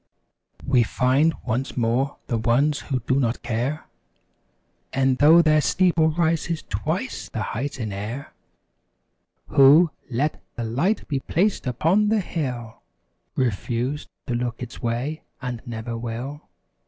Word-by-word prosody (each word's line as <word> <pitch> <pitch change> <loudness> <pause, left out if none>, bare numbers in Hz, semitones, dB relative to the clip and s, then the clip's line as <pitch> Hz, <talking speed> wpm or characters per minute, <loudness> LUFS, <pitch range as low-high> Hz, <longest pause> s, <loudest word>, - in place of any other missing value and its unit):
We 130 -3 +4
find 130 +7 +2
once 125 +3 -2
more 125 +4 +1
the 115 -3 -1
ones 135 +6 +2
who 130 -4 -3
do 130 +4 +1
not 120 -2 -1
care 120 +6 -2 1.1
E'en 135 0 +3
though 160 +4 +7
thy 155 -1 +4
steeple 170 0 +3
reaches 165 0 0
twice 100 0 -3
the - - -3
height 135 +4 -4
in 110 -4 -3
air; 110 +8 -6 1.2
Who, 150 +5 +7 0.2
let 135 +5 -1
the 120 - -3
"Light 135 - 0
be 140 -3 -1
placed 185 +2 0
upon 170 - +2
the 220 0 +3
hill" 125 - -4 0.5
Refuse 125 +4 -1 0.2
to 125 - -2
look 120 0 -2
its 120 - -9
way 125 +7 -2 0.2
and 125 -3 -5
never 115 0 -4
will. 120 +5 -5
130 Hz, 130 wpm, -24 LUFS, 120-155 Hz, 1.2 s, though